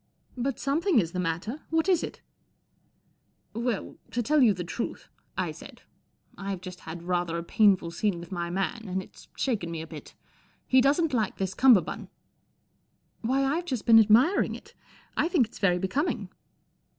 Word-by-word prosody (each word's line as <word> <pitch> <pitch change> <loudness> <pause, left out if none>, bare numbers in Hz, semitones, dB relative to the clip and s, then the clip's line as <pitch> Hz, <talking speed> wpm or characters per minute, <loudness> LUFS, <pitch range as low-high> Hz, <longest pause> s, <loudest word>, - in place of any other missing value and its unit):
" - - -45
But 260 +1 -2
something 320 +4 +1
is 170 -5 -1
the 180 - -3
matter. 180 - -3
What 325 +2 +1
is 365 -3 +3
it? - - -6 0.5
" - - -42
" - - -44
Well, 230 -5 -3
to 240 - -1
tell 300 +5 +3
you 235 -4 +6
the 180 -3 -3
truth," 205 +7 -5 0.3
I - - -1
said, - - -12 0.3
" - - -50 0.3
I've 195 -2 -4
just 185 -1 -8
had 165 +1 -8
rather 175 -1 -1
a 170 - -4
painful 190 -2 +3
scene 195 0 -1
with 170 +1 -11
my 175 -2 -3
man, 195 +6 -2
and 190 0 -2
it's - - -17
shaken 215 -10 -1
me 165 -1 -4
a 160 - -5
bit. - - -11 0.5
He 260 0 +5
doesn't 290 +3 +2
like 220 -5 0
this 190 -1 -2
cummerbund." 240 -3 +4 0.6
" - - -44
Why, 260 +4 +1
I've 310 +6 0
just 255 -10 -3
been 225 -1 +8
admiring 225 - +4
it. - - -13 0.4
I - - +2
think 335 -9 +3
it's 225 - -14
very 180 -3 +3
becoming." 215 - -1
215 Hz, 185 wpm, -27 LUFS, 180-270 Hz, 0.6 s, been